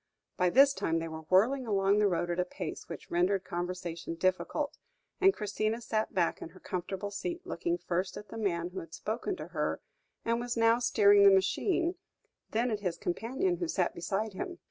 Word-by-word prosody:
By 180 Hz, 0 st, +2 dB
this 275 Hz, +7 st, +6 dB
time 165 Hz, -10 st, 0 dB
they 165 Hz, 0 st, -2 dB
were 160 Hz, -1 st, -8 dB
whirling 240 Hz, +8 st, +3 dB
along 200 Hz, -1 st, +3 dB
the 210 Hz, -, +4 dB
road 175 Hz, -2 st, 0 dB
at 175 Hz, -, -2 dB
a -, -, +4 dB
pace 180 Hz, -, -7 dB
which 165 Hz, -, -8 dB
rendered 185 Hz, +3 st, +2 dB
conversation 175 Hz, -2 st, -4 dB
difficult, 185 Hz, -, -1 dB, 0.4 s
and 385 Hz, 0 st, +6 dB
Christina 215 Hz, -, -2 dB
sat 220 Hz, -2 st, -1 dB
back 175 Hz, -3 st, 0 dB
in -, -, -6 dB
her 185 Hz, +2 st, -16 dB
comfortable 190 Hz, +2 st, -4 dB
seat, 345 Hz, -, -4 dB
looking 345 Hz, 0 st, -1 dB
first 180 Hz, -, -2 dB
at 210 Hz, -, -10 dB
the 225 Hz, -, -7 dB
man 175 Hz, -5 st, -1 dB
who 190 Hz, -, -5 dB
had 165 Hz, 0 st, -9 dB
spoken 235 Hz, -, -3 dB
to -, -, -8 dB
her, -, -, -1 dB, 0.5 s
and 230 Hz, +1 st, +1 dB
was 240 Hz, 0 st, -3 dB
now 230 Hz, +1 st, +4 dB
steering 205 Hz, -4 st, +5 dB
the 200 Hz, -, +9 dB
machine, 335 Hz, -, +2 dB, 0.6 s
then 235 Hz, +2 st, 0 dB
at 215 Hz, -, -1 dB
his 180 Hz, -4 st, -2 dB
companion 260 Hz, -, -1 dB
who 345 Hz, -, -2 dB
sat 185 Hz, -, 0 dB
beside 200 Hz, +4 st, -2 dB
him. 355 Hz, -, -5 dB
200 Hz, 195 wpm, -31 LUFS, 180-235 Hz, 0.6 s, the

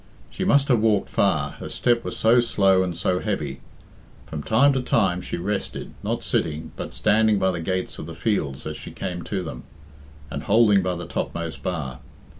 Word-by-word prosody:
She -, -, -3 dB
must 140 Hz, -1 st, +4 dB
have 120 Hz, -4 st, +5 dB
walked 105 Hz, -2 st, +2 dB
far, -, -, +1 dB
her -, -, -6 dB
step 120 Hz, -1 st, +1 dB
was -, -, -5 dB
so 115 Hz, +2 st, +5 dB
slow 100 Hz, -5 st, +3 dB
and 90 Hz, -2 st, -2 dB
so 90 Hz, 0 st, +1 dB
heavy. 75 Hz, -11 st, -3 dB, 0.6 s
From 75 Hz, -, -5 dB
time 135 Hz, -, +4 dB
to 130 Hz, -, 0 dB
time 95 Hz, -7 st, +1 dB
she -, -, -4 dB
rested, 100 Hz, +3 st, -3 dB
not -, -, -2 dB
sitting, 80 Hz, 0 st, -1 dB
but -, -, -6 dB
standing 110 Hz, 0 st, +3 dB
by 95 Hz, -1 st, +2 dB
the 90 Hz, -, -4 dB
gates 95 Hz, +2 st, -2 dB
of 80 Hz, -, -6 dB
the 85 Hz, -, -8 dB
fields 80 Hz, -7 st, -1 dB
as 75 Hz, 0 st, -4 dB
she -, -, -9 dB
came 90 Hz, -1 st, -5 dB
to 95 Hz, -3 st, -2 dB
them, 80 Hz, -, -6 dB, 0.7 s
and 70 Hz, -, -3 dB
holding 105 Hz, +2 st, +4 dB
by 90 Hz, -1 st, -1 dB
the 85 Hz, 0 st, -6 dB
topmost 85 Hz, -1 st, -4 dB
bar. 75 Hz, -8 st, -3 dB
95 Hz, 195 wpm, -24 LUFS, 85-110 Hz, 0.7 s, have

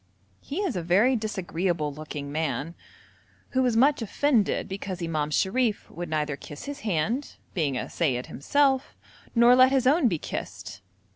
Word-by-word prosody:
He 305 Hz, -, -4 dB
is 365 Hz, -, -1 dB
a 180 Hz, -, -1 dB
very 200 Hz, +10 st, +3 dB
disagreeable 175 Hz, -7 st, -2 dB
looking 145 Hz, -1 st, -6 dB
man, 160 Hz, +1 st, -2 dB, 0.8 s
who 260 Hz, -, +1 dB
was 245 Hz, -3 st, +2 dB
much 280 Hz, +3 st, +4 dB
offended 230 Hz, 0 st, +1 dB
because 195 Hz, -1 st, -5 dB
Imam 155 Hz, -3 st, -1 dB
Sharif 210 Hz, +7 st, 0 dB
would 175 Hz, -1 st, -6 dB
neither 150 Hz, -2 st, -1 dB
kiss 145 Hz, +1 st, -10 dB
his 285 Hz, 0 st, -6 dB
hand, 220 Hz, -, -1 dB, 0.2 s
being 145 Hz, -7 st, 0 dB
a -, -, -2 dB
seyyid 130 Hz, -7 st, -1 dB
himself, 270 Hz, -, +1 dB, 0.4 s
nor 235 Hz, +1 st, +7 dB
let 255 Hz, +1 st, +6 dB
his 265 Hz, -2 st, +2 dB
own 280 Hz, +1 st, +4 dB
be 175 Hz, -7 st, 0 dB
kissed. -, -, -6 dB
195 Hz, 155 wpm, -26 LUFS, 155-255 Hz, 0.8 s, nor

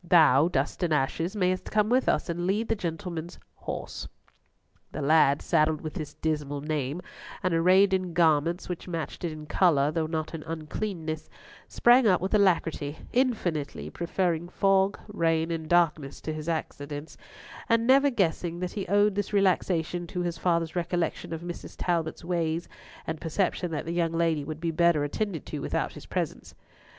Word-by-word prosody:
Thou, 160 Hz, -4 st, +6 dB
Dust 140 Hz, -1 st, -1 dB
and 175 Hz, -2 st, 0 dB
Ashes, 165 Hz, +6 st, 0 dB
mayest 185 Hz, -2 st, 0 dB
come 210 Hz, -1 st, +2 dB
with 250 Hz, +3 st, +2 dB
us -, -, +1 dB
and 175 Hz, 0 st, -2 dB
lead 210 Hz, +4 st, 0 dB
the -, -, +2 dB
gentleman's 170 Hz, -2 st, -5 dB, 0.2 s
horse." -, -, -6 dB, 0.9 s
The 150 Hz, -, -4 dB
lad, 145 Hz, -1 st, +4 dB
saddled 155 Hz, -2 st, +2 dB
with 155 Hz, -, -5 dB
this 155 Hz, -3 st, -6 dB
dismal 150 Hz, -2 st, -2 dB
name, 150 Hz, +2 st, -2 dB, 0.4 s
and 185 Hz, -1 st, +1 dB
arrayed 185 Hz, +4 st, +5 dB
in 185 Hz, -2 st, 0 dB
garments 165 Hz, 0 st, +2 dB
which 180 Hz, 0 st, -5 dB
matched 165 Hz, -3 st, -5 dB
it 170 Hz, -, -1 dB
in 155 Hz, 0 st, -8 dB
colour 150 Hz, -3 st, +3 dB
though 160 Hz, -1 st, -1 dB
not 160 Hz, 0 st, -3 dB
in 165 Hz, -, -5 dB
uncleanliness, 160 Hz, 0 st, -4 dB, 0.4 s
sprang 240 Hz, 0 st, +5 dB
up 185 Hz, -3 st, +4 dB
with 190 Hz, +4 st, -3 dB
alacrity, 165 Hz, -7 st, +2 dB, 0.2 s
infinitely 175 Hz, -, -1 dB
preferring 175 Hz, -1 st, -1 dB
fog, 195 Hz, +1 st, +2 dB
rain, 165 Hz, -5 st, 0 dB
and 160 Hz, -1 st, -4 dB
darkness 160 Hz, -5 st, +2 dB
to 155 Hz, -, -4 dB
his 155 Hz, +1 st, -5 dB
accidence, 145 Hz, -2 st, -4 dB, 0.5 s
and 230 Hz, 0 st, +3 dB
never 275 Hz, +3 st, +5 dB
guessing 175 Hz, -6 st, 0 dB
that 180 Hz, 0 st, -3 dB
he 200 Hz, -3 st, -4 dB
owed 205 Hz, +2 st, +3 dB
this 205 Hz, +1 st, -2 dB
relaxation 175 Hz, -3 st, +1 dB
to 180 Hz, -, -3 dB
his 175 Hz, -1 st, -2 dB
father's 170 Hz, -2 st, 0 dB
recollection 175 Hz, -2 st, -2 dB
of 165 Hz, 0 st, -4 dB
Mrs. 175 Hz, 0 st, -7 dB
Talbot's 170 Hz, -1 st, -1 dB
ways, 170 Hz, -1 st, -1 dB, 0.4 s
and 160 Hz, -, -4 dB
perception 175 Hz, +1 st, -1 dB
that 155 Hz, -2 st, -3 dB
the 165 Hz, -, -3 dB
young 170 Hz, -1 st, 0 dB
lady 165 Hz, -3 st, +1 dB
would 155 Hz, +1 st, -6 dB
be 165 Hz, 0 st, -1 dB
better 170 Hz, -2 st, +3 dB
attended 170 Hz, +2 st, -3 dB
to -, -, -5 dB
without -, -, -2 dB
his -, -, -11 dB
presence. -, -, -4 dB
170 Hz, 170 wpm, -27 LUFS, 155-185 Hz, 0.9 s, Thou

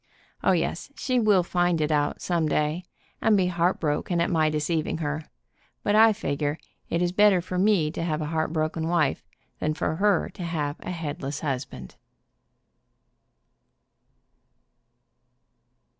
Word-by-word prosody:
O, -, -, +4 dB
yes, 170 Hz, +7 st, -2 dB
she 255 Hz, -4 st, 0 dB
will 210 Hz, -5 st, +4 dB
find 175 Hz, -1 st, +1 dB
it 155 Hz, 0 st, 0 dB
out, 145 Hz, -1 st, 0 dB
some 170 Hz, -3 st, +1 dB
day, 150 Hz, +4 st, 0 dB, 0.4 s
and 220 Hz, -2 st, +4 dB
be 185 Hz, -, +3 dB
heartbroken 170 Hz, -1 st, 0 dB
at 170 Hz, -, +1 dB
my 160 Hz, -2 st, +3 dB
deceiving 155 Hz, +1 st, -1 dB
her, 150 Hz, -1 st, -3 dB, 0.6 s
but 205 Hz, -, +1 dB
I 220 Hz, +1 st, +7 dB
figure 145 Hz, -7 st, -2 dB, 0.3 s
it 170 Hz, +1 st, 0 dB
is 175 Hz, -, +1 dB
better 205 Hz, 0 st, +5 dB
for 180 Hz, +1 st, -3 dB
me 185 Hz, -6 st, +3 dB
to -, -, -5 dB
have 155 Hz, -3 st, -1 dB
a 155 Hz, -, -2 dB
heartbroken 160 Hz, 0 st, -1 dB
wife 170 Hz, -3 st, +1 dB, 0.4 s
than 155 Hz, 0 st, -1 dB
for 160 Hz, 0 st, -2 dB
her 200 Hz, -2 st, +2 dB
to 195 Hz, -, -11 dB
have 150 Hz, -4 st, -2 dB
a -, -, -7 dB
headless 150 Hz, -4 st, -4 dB
husband." 130 Hz, -, -5 dB
165 Hz, 140 wpm, -26 LUFS, 150-180 Hz, 0.6 s, I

